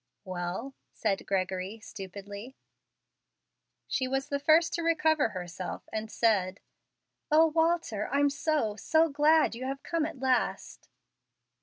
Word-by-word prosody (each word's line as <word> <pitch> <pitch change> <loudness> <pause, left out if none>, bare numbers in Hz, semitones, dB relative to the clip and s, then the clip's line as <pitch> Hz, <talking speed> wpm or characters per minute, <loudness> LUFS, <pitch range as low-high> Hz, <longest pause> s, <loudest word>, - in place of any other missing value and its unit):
"Well?" 185 +8 -4 0.2
said 200 -3 -1
Gregory, 190 +2 -2
stupidly. 205 +3 -9 1.3
She 260 - -1
was 270 +1 -2
the 280 - -1
first 320 +3 +4
to 340 - -1
recover 320 -5 +2
herself, 180 -2 -6
and 220 0 -3
said, 200 -4 +1 0.7
"O, 315 +2 +6
Walter, 320 -9 +1
I'm 285 0 +3
so 285 -7 0
so 320 +9 +2
glad 300 +1 +4
you 240 +2 -6
have 270 +1 -4
come 330 -2 0
at 325 -3 -9
last!" 260 -1 -1
260 Hz, 125 wpm, -29 LUFS, 200-310 Hz, 1.3 s, O